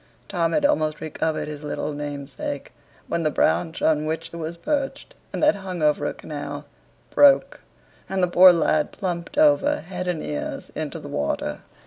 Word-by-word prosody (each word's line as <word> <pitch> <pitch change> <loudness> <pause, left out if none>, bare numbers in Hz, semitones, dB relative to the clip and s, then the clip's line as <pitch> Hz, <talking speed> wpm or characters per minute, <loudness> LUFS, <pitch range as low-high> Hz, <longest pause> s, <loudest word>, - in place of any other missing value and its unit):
Tom 170 -3 0
had 295 - +2
almost 155 - +1
recovered 160 0 -2
his 150 -1 -6
little 150 0 -3
namesake, 145 -1 -5 0.4
when 170 - -1
the 155 - +2
branch 165 +2 +1
on 155 -1 +2
which 160 +1 -3
it - - -6
was 165 +1 -5
perched, 280 - -2 0.2
and - - -3
that 305 - +6
hung 185 -4 -5
over 150 -1 +2
a - - -2
canal, 145 -1 -6 0.5
broke, 285 -1 +5 0.5
and 190 -1 0
the - - +4
poor 180 +1 +8
lad 155 -3 +1
plumped 180 +2 -4
over 295 -1 +4
head 180 +1 -5
and 175 -3 -1
ears 75 -1 -5
into - - -4
the - - -9
water. 70 -1 -2
165 Hz, 170 wpm, -24 LUFS, 150-185 Hz, 0.5 s, poor